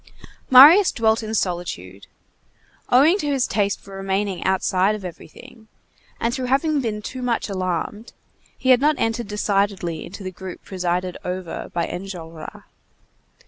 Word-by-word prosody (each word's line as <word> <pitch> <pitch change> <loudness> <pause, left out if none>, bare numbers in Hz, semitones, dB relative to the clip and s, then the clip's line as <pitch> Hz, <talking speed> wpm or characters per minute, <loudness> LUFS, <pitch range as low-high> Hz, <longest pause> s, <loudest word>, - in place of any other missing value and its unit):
Marius 300 +10 +9
dwelt 220 -1 +1
in 220 0 -4
solitude. 170 - -4 0.8
Owing 300 +10 +5
to 295 - -2
his 275 -3 +1
taste 200 -1 0
for 195 0 -12
remaining 195 0 -2
outside 190 +1 +1
of 205 -3 -8
everything, 200 +6 -12 0.5
and 230 +1 0
through 255 -1 -3
having 280 +3 +1
been 210 -3 -3
too 255 +3 -6
much 240 -3 -1
alarmed, 185 +4 -3 0.5
he 260 - -2
had 255 0 +5
not 300 +1 +3
entered 225 0 -1
decidedly 200 -5 -1
into 195 +3 -9
the 185 - -5
group 185 0 -9
presided 180 -1 -2
over 180 -1 -5
by 170 -1 -1
Enjolras. 175 -4 -8
200 Hz, 140 wpm, -22 LUFS, 180-240 Hz, 0.8 s, Marius